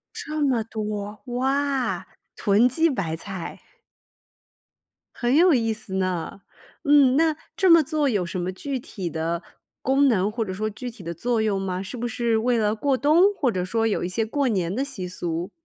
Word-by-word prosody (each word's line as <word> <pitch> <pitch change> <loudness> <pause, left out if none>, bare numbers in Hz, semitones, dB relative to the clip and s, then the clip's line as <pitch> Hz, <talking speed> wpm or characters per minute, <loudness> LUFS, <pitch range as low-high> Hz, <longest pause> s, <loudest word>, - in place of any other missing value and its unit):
这 305 0 -4
么 260 -6 +2
多。 210 -1 -5
哇， 265 +2 0 0.3
囤 210 +4 +4
积 325 +6 +2
白 175 - -2
菜。 185 0 -7 1.5
很 245 +3 +1
有 345 -2 +6
意 225 -2 +1
思 215 -3 -7
呢。 185 0 -2 0.4
嗯， 285 -3 +5
那 320 -1 +3 0.2
这 375 -2 +3
么 335 -1 +8
做 300 -1 0
有 200 -7 0
什 180 - -4
么 180 +1 -2
具 270 +7 -4
体 190 -7 -5
的 165 +2 -2 0.4
功 275 +1 +3
能 205 -3 +2
或 225 0 -2
者 190 - -5
说 215 +3 -2
具 245 +4 -6
体 220 -7 -13
的 170 0 -4
作 235 +6 0
用 205 -3 +1
吗？ 185 -1 -2
是 195 +6 -6
不 240 +1 -3
是 235 -1 0
为 240 +1 +1
了 210 0 +1
过 270 +4 +1
冬 330 +9 +4
或 270 -9 +1
者 180 -1 -1
说 225 +4 0
有 215 - 0
一 175 - -1
些 220 +4 -1
过 275 +3 0
年 185 -4 0
的 270 +3 0
习 220 -10 -6
俗？ 175 -1 -4
225 Hz, 205 characters per minute, -24 LUFS, 190-270 Hz, 1.5 s, 么